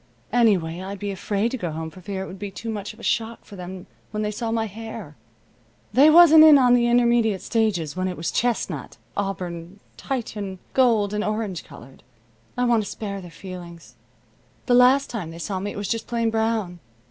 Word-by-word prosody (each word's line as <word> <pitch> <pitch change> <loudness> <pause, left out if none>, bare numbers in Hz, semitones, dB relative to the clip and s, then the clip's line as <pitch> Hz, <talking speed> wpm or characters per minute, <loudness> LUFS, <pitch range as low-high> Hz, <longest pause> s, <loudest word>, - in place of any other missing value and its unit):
Anyway, 185 -8 +2
I'd 195 +2 -6
be 200 +1 -4
afraid 205 +4 -1
to 260 - -3
go 175 - -3
home 160 +1 -5
for 185 - -13
fear 190 +1 -4
it - - -7
would 190 - -10
be 205 0 -5
too 225 +4 -6
much 205 -2 -5
of 215 - -17
a - - -12
shock 230 -1 -1
for 205 - -12
them 180 0 -8 0.2
when 215 0 -3
they 210 - -1
saw 225 +2 -4
my 225 0 0
hair. 220 -6 -8 0.8
They 275 +6 +7
wasn't 320 -1 +9
in 310 -2 +9
on 250 -2 +5
the 240 -1 +4
intermediate 235 -4 +2
stages 190 -10 0
when 185 0 -1
it 180 - -4
was 165 0 -2
chestnut, 240 -1 -2 0.2
auburn, 180 -2 -4 0.2
Titian, 210 -7 -4 0.2
gold, 225 -6 +3
and 210 0 -1
orange 215 -5 -3
colored. 135 +3 -14 0.6
I 250 - +2
want 235 -3 +3
to - - -7
spare 200 -2 -5
their 175 - -10
feelings. 170 0 -10 0.7
The 250 - +2
last 255 +3 +5
time 205 -9 -4
they 165 - -9
saw 185 +3 -3
me 200 +2 -3
it - - -7
was 205 -1 -3
just 230 -1 -2
plain 230 -1 0
brown. 220 -5 -1
210 Hz, 205 wpm, -23 LUFS, 185-230 Hz, 0.8 s, wasn't